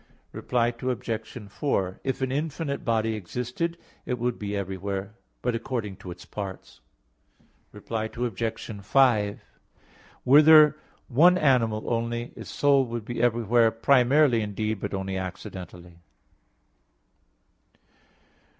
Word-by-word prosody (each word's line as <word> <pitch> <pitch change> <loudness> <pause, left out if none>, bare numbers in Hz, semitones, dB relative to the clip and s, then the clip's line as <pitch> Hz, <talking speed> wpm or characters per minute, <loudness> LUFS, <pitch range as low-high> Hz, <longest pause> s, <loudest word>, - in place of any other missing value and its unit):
Reply 120 -1 0
Obj. 115 -2 -4
4: 95 -2 -2
If 135 0 -2
an 130 - -1
infinite 145 0 -3
body 110 -1 0
existed, 125 - -4 0.3
it 125 - -3
would 120 0 -2
be 105 -1 -3
everywhere; 95 +1 -4 0.3
but 125 - 0
according 115 -4 -4
to 90 - -10
its 90 0 -9
parts. 100 -3 -8 0.9
Reply 110 +1 -4
Obj. 115 -2 -4
5: 110 -5 +3 0.8
Were 140 +4 +8
there 155 -1 +7 0.3
one 170 +8 +5
animal 120 -9 +2
only, 120 +1 -3
its - - -9
soul 140 -1 +3
would 115 -2 -5
be 120 0 -4
everywhere 120 -1 +3
primarily 125 +2 +3
indeed, 105 0 -3
but - - -4
only 95 0 -3
accidentally. 90 -2 -8
115 Hz, 115 wpm, -26 LUFS, 100-130 Hz, 0.9 s, Were